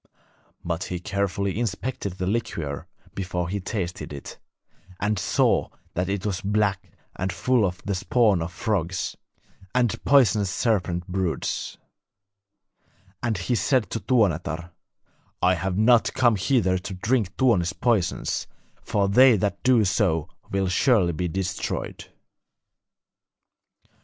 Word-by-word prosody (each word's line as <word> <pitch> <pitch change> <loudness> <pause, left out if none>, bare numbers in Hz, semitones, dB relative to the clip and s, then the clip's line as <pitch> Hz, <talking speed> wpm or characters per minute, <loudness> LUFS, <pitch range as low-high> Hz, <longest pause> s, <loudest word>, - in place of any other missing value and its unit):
But 85 +2 -2
he 90 - -4
carefully 100 +2 -1
inspected 115 -3 -3
the 90 0 -4
liquor 85 - -3 0.3
before 90 -2 -3
he 100 +2 -2
tasted 90 -6 -4
it, 70 -1 -8 0.6
and 105 -1 0
saw - - +2 0.2
that 90 +1 -1
it 100 0 -2
was 95 -3 -1
black 100 -1 0 0.3
and 95 +1 -2
full 115 +7 +2
of 90 -2 -2
the 100 - -1
spawn 100 -1 +2
of 85 +2 -4
frogs 90 -3 -2 0.6
and 120 -3 +1
poisonous 110 -8 +4
serpent 90 -5 0
broods; 90 -2 -2 1.4
and 115 -4 0
he 90 +8 -1
said 125 0 +1
to 115 - -2
Tuonetar: 90 -8 0 0.7
'I 90 +1 +4
have 90 +1 -2
not 115 +2 +4
come 120 -3 +4
hither 95 -2 +2
to 95 +1 -6
drink 105 -1 0
Tuoni's 105 -10 +3
poisons, 110 -8 0 0.3
for 100 -1 0
they 125 +3 +6
that 100 0 -1
do 125 -4 +4
so 90 -5 +1 0.2
will 95 -1 0
surely 90 -2 +3
be 90 +3 -2
destroyed.' 95 +2 -3
95 Hz, 125 wpm, -25 LUFS, 90-110 Hz, 1.4 s, they